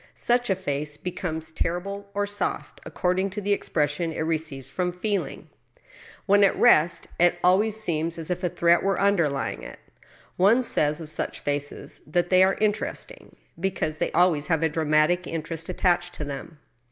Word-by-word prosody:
Such 240 -1 +1
a 190 - +3
face 150 -5 -3
becomes 160 -2 -4
terrible 200 +5 -3
or 205 0 +1
soft 205 0 -3
according 185 +2 0
to 200 +2 -5
the 205 0 +1
expression 155 -2 -1
it 160 - -4
receives 155 -4 -2
from 180 +6 -2
feeling. 200 +3 -3 0.8
When 205 0 +5
at 195 - +3
rest, 170 -8 +4
it 175 0 +4
always 200 +4 +3
seems 170 -4 0
as 165 +1 -3
if 180 +1 -3
a 180 - +1
threat 170 +1 +3
were 195 -1 0
underljring 170 -9 +1
it. - - -9 0.6
One 215 +8 +4
says 150 -8 +1
of 155 - -8
such - - -4
faces 145 0 -3
that 175 +3 0
they 185 0 +6
are 190 +1 +4
interesting, 215 0 -3 0.2
because 165 -4 -2
they - - 0
always 165 -3 +3
have 165 -2 +1
a 160 - +3
dramatic 155 +3 +2
interest 165 0 -4
attached 175 -1 +1
to 150 - -4
them. 145 +3 -7
175 Hz, 165 wpm, -25 LUFS, 155-195 Hz, 0.8 s, they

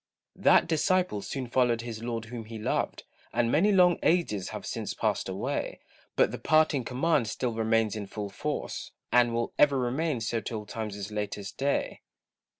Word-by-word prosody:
That - - +5
disciple 170 - +1
soon 130 +5 -4
followed 120 -1 +2
his 115 -2 -6
Lord 115 -1 -3
whom 115 -1 -7
he 110 +1 -7
loved, 110 - -1 0.3
And 120 0 +1
many 185 +10 +4
long 180 -3 +5
ages 105 - +1
have - - -6
since - - -4
passed - - -1
away; - - -3 0.4
But - - +4
the - - -5
parting 155 -3 +3
command 130 +1 +1
still 120 +2 -2
remains 110 -1 +1
in 105 -2 -5
full 100 0 -5
force, - - -4 0.2
And 120 -1 +5
will 115 0 -1
ever 140 -2 +5
remain 130 +3 0
so 115 0 -1
till 105 -1 -5
time's 105 -1 -5
latest 105 -1 -4
day. 140 +1 0
120 Hz, 165 wpm, -28 LUFS, 110-140 Hz, 0.4 s, That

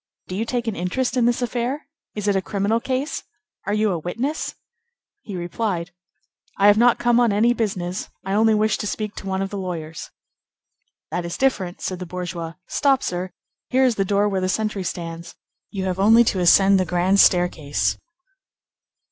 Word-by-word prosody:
Do 185 - -5
you 220 +4 -1
take 245 0 -2
an 225 -3 -2
interest 240 +10 -1
in 245 -2 +3
this 240 +1 +1
affair? 245 +5 -2 0.3
Is 210 -1 -3
it 200 - +3
a 190 - +2
criminal 205 +4 0
case? 265 +4 -2 0.5
Are 205 - 0
you 215 -1 +2
a 175 - -1
witness?" 240 - -3 0.7
He 200 - -7
replied:— 175 0 -3 0.7
"I 200 - +3
have 205 0 +7
not 240 0 +5
come 240 0 +3
on 240 -3 +4
any 225 +4 +3
business; 190 -6 -3 0.2
I 195 - -2
only 220 +1 +4
wish 215 0 +1
to 210 - -3
speak 210 0 -3
to 195 - -7
one 190 0 -1
of 195 - -5
the 200 - -4
lawyers." 165 -4 -5 1.0
"That 175 - -2
is 170 0 -5
different," 195 -10 0
said 185 -2 -3
the 180 - -6
bourgeois. 175 -2 -5
"Stop, 275 -2 +2
sir; 180 +1 -3 0.4
here 260 +1 +3
is 250 - +3
the 200 - 0
door 200 +1 +2
where 195 -2 -1
the 185 - 0
sentry 210 0 -1
stands. 170 -1 -6 0.3
You 190 -2 -4
have 185 0 -2
only 225 +4 +6
to 200 -4 0
ascend 195 +2 +5
the 185 - +1
grand 180 +3 +2
staircase." 170 -7 +2
200 Hz, 190 wpm, -22 LUFS, 180-230 Hz, 1.0 s, have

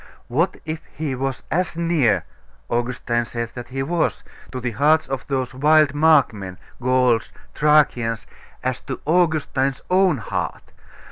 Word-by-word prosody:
What 165 +9 +1
if 155 0 -4
he 150 -1 -2
was 135 0 -3
as 175 +1 0
near 165 - +2 0.5
Augustine 120 0 0
said 115 0 -5
that 120 -1 -7
He 135 +1 -2
was 165 +3 -1 0.3
to 130 - -4
the 125 -1 -2
hearts 150 +7 +3
of 135 -1 -4
those 130 -2 -2
wild 150 +2 +4
Markmen, 140 - +3 0.2
Gauls, 125 -2 +2 0.2
Thracians, 125 -7 +2 0.4
as 130 -1 -1
to 135 -3 -6
Augustine's 155 -5 +1
own 185 -4 +4
heart? 115 - -4
135 Hz, 135 wpm, -22 LUFS, 120-155 Hz, 0.5 s, wild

